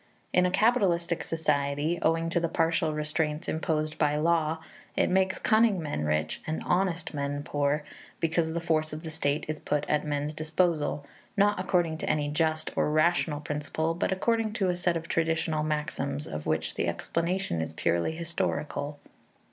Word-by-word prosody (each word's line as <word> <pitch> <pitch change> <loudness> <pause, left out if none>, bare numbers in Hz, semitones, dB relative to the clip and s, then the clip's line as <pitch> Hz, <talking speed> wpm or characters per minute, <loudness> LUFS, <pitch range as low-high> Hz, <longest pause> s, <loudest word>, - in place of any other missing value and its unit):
In 180 0 +5
a - - +1
capitalistic 185 -5 +2
society, 150 0 0
owing 165 +1 +2
to 170 - +2
the 170 -1 0
partial 165 0 +1
restraints 150 0 -1
imposed 155 -1 -1
by 150 -1 +3
law, 160 0 +2 0.4
it - - +3
makes 190 0 +2
cunning 220 -3 +3
men 145 - -2
rich 75 +1 0
and 155 +1 -2
honest 180 -3 0
men 145 0 -2
poor, 145 0 0 0.4
because 165 0 +1
the 170 - 0
force 155 -2 0
of 155 +2 -6
the 160 - -5
state 150 -1 0
is 155 0 -3
put 150 0 -1
at 150 - +1
men's 145 0 -2
disposal, 155 -2 0 0.3
not 205 0 +4
according 175 -4 +1
to - - -2
any 145 -1 +1
just 155 +1 0
or - - +2
rational 155 -1 +2
principle, 150 +2 -2
but 175 +3 -1
according 225 +3 +1
to 195 -4 +1
a 180 - +1
set 175 -1 +1
of 165 0 -7
traditional 160 -2 0
maxims 150 -1 -2
of 75 0 -6
which 80 0 0
the - - -1
explanation 170 - -1
is 80 0 -3
purely 85 - +1
historical. 155 -3 -2
160 Hz, 170 wpm, -28 LUFS, 150-170 Hz, 0.4 s, In